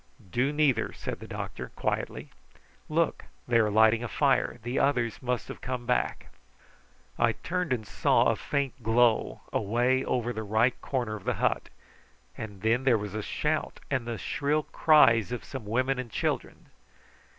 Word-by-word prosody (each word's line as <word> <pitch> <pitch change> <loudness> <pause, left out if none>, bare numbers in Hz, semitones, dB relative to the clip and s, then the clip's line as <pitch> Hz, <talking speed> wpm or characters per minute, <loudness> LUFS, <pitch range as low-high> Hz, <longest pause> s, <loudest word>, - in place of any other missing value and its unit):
"Do 125 +8 +1
neither!" 145 -7 +2
said - - -5
the - - -9
doctor 65 -1 -6
quietly. - - -3 0.6
"Look! 165 +1 0 0.2
they 120 -1 +4
are 110 -2 +3
lighting 110 +2 +4
a - - -2
fire. 135 -1 +1
The 120 +3 -1
others 120 -5 +1
must 125 -3 -2
have - - -8
come 125 -1 -4
back." 125 +1 -1 0.9
I 115 -1 +3
turned 180 +2 -3
and 115 -4 -1
saw 100 - +2
a - - +3
faint 140 -2 -2
glow 115 +1 +2
away 120 +5 +1
over 120 -1 -1
the 110 - -4
right 110 +4 +2
corner 120 -5 -2
of 105 - -9
the - - 0
hut; - - 0 0.7
and 105 -3 -8
then 115 +3 +2
there 130 -3 +4
was 105 -2 -5
a 110 - -2
shout, 150 +8 -2
and 130 -4 -1
the 115 -1 -3
shrill 150 +8 0
cries 125 - +4
of 125 - -4
some 130 -6 -7
women 130 +4 +1
and 125 -2 -5
children. - - -3
120 Hz, 165 wpm, -28 LUFS, 110-135 Hz, 0.9 s, they